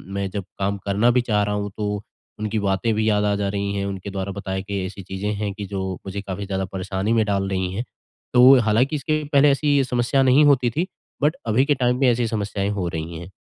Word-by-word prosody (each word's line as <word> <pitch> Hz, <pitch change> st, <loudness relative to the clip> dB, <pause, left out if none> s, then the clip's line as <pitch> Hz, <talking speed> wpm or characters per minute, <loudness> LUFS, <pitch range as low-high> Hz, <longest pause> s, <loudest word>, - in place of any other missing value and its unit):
मैं 100 Hz, -1 st, -2 dB
जब 100 Hz, 0 st, -4 dB, 0.2 s
काम 100 Hz, +1 st, 0 dB
करना 105 Hz, +4 st, +3 dB
भी 125 Hz, +1 st, +3 dB
चाह 105 Hz, -3 st, +1 dB
रहा 105 Hz, 0 st, -1 dB
हूँ, 100 Hz, 0 st, -3 dB
तो 105 Hz, -1 st, -2 dB, 0.4 s
उनकी 110 Hz, 0 st, -1 dB
बातें 100 Hz, +3 st, 0 dB
भी 110 Hz, +1 st, +1 dB
याद 105 Hz, -1 st, +2 dB
आ 100 Hz, 0 st, +2 dB
जा 100 Hz, -1 st, -1 dB
रही 100 Hz, 0 st, -2 dB
हैं। 100 Hz, 0 st, -1 dB
उनके 100 Hz, 0 st, -5 dB
द्वारा 95 Hz, 0 st, -3 dB
बताई 95 Hz, -1 st, -4 dB
कई 100 Hz, -1 st, -3 dB
ऐसी 95 Hz, +2 st, -7 dB
चीज़ें 95 Hz, +2 st, -3 dB
हैं, 100 Hz, -1 st, -3 dB
कि 100 Hz, 0 st, -6 dB
जो 95 Hz, -1 st, -3 dB
मुझे 100 Hz, +1 st, -4 dB
काफ़ी 100 Hz, 0 st, -5 dB
ज़्यादा 95 Hz, -1 st, -2 dB
परेशानी 95 Hz, +3 st, -2 dB
में 110 Hz, -2 st, +3 dB
डाल 100 Hz, -2 st, 0 dB
रही 95 Hz, -1 st, -2 dB
हैं। 115 Hz, +5 st, -3 dB, 0.5 s
तो 125 Hz, +2 st, +8 dB
हालाँकि 115 Hz, +6 st, +2 dB
इसके 155 Hz, +2 st, -1 dB
पहले 140 Hz, +1 st, +6 dB
ऐसी 145 Hz, 0 st, +2 dB
समस्या 125 Hz, +1 st, +1 dB
नहीं 130 Hz, +3 st, +5 dB
होती 130 Hz, -4 st, +4 dB
थी 170 Hz, +10 st, -1 dB, 0.3 s
बट 150 Hz, +2 st, +2 dB
अभी 115 Hz, +5 st, +3 dB
के 145 Hz, 0 st, +2 dB
टाइम 125 Hz, -1 st, +1 dB
पे 135 Hz, -, +4 dB
ऐसी 120 Hz, 0 st, 0 dB
समस्याएँ 100 Hz, -2 st, -2 dB
हो 90 Hz, -, -1 dB
रही 80 Hz, 0 st, -5 dB
हैं। 85 Hz, +2 st, -9 dB
105 Hz, 235 wpm, -22 LUFS, 100-120 Hz, 0.5 s, तो